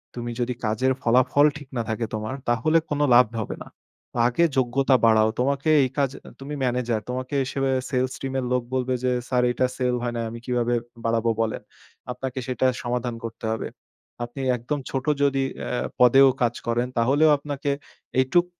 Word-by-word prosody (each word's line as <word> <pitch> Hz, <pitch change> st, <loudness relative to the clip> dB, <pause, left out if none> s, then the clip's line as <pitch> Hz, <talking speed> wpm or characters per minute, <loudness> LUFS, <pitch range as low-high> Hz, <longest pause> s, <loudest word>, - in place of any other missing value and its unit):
তুমি 120 Hz, -1 st, -4 dB
যদি 125 Hz, +1 st, 0 dB
কাজের 110 Hz, +5 st, +1 dB
ফলাফল 130 Hz, +4 st, +4 dB
ঠিক 145 Hz, -, -11 dB
না -, -, +1 dB
থাকে, 115 Hz, +1 st, -1 dB
তোমার 110 Hz, +3 st, -3 dB, 0.2 s
তাহলে 120 Hz, +8 st, +3 dB
কোনো 145 Hz, 0 st, 0 dB
লাভ 125 Hz, +1 st, +8 dB, 0.2 s
হবে 105 Hz, -, -5 dB
না। -, -, -16 dB, 0.6 s
আগে 125 Hz, +8 st, +2 dB
যোগ্যতা 130 Hz, +1 st, +3 dB
বাড়াও। 110 Hz, -1 st, +5 dB
তোমাকে 140 Hz, +3 st, +1 dB
এই 130 Hz, -, 0 dB
কাজ 140 Hz, -2 st, +2 dB, 0.3 s
তুমি 140 Hz, +2 st, -7 dB
ম্যানেজার 120 Hz, -3 st, 0 dB
তোমাকে 130 Hz, +2 st, -3 dB
হিসেবে 135 Hz, +1 st, -1 dB, 0.2 s
সেলস 130 Hz, -1 st, 0 dB
টীম 135 Hz, -1 st, -4 dB
এর 130 Hz, -, -3 dB
লোক 125 Hz, -1 st, +1 dB
বলবে 130 Hz, 0 st, 0 dB
যে, 125 Hz, -, +2 dB, 0.2 s
"স্যার 125 Hz, -1 st, +1 dB
এটা 130 Hz, +1 st, +1 dB
সেল 125 Hz, -1 st, +1 dB
হয় 120 Hz, -, -2 dB
না। -, -, -1 dB
আমি 115 Hz, +1 st, -7 dB
কিভাবে 120 Hz, -1 st, 0 dB, 0.3 s
বাড়াবো 115 Hz, 0 st, +1 dB
বলেন।" 110 Hz, -1 st, -2 dB, 0.5 s
আপনাকে 130 Hz, +1 st, -4 dB
সেটা 130 Hz, 0 st, 0 dB, 0.2 s
সমাধান 120 Hz, 0 st, -2 dB
করতে 115 Hz, 0 st, -6 dB
হবে। 110 Hz, -, -3 dB, 0.6 s
আপনি 120 Hz, +3 st, -6 dB, 0.2 s
একদম 135 Hz, +5 st, -3 dB
ছোট 135 Hz, -1 st, -3 dB, 0.2 s
যদি 135 Hz, -1 st, +2 dB, 0.2 s
আ -, -, -4 dB, 0.3 s
পদেও 135 Hz, +2 st, +7 dB
কাজ 120 Hz, -1 st, +2 dB
করেন, 120 Hz, +1 st, +1 dB
তাহলেও 140 Hz, +7 st, +4 dB
আপনাকে 145 Hz, 0 st, -3 dB, 0.5 s
এইটুক 175 Hz, +7 st, +3 dB
125 Hz, 175 wpm, -24 LUFS, 120-135 Hz, 0.6 s, লাভ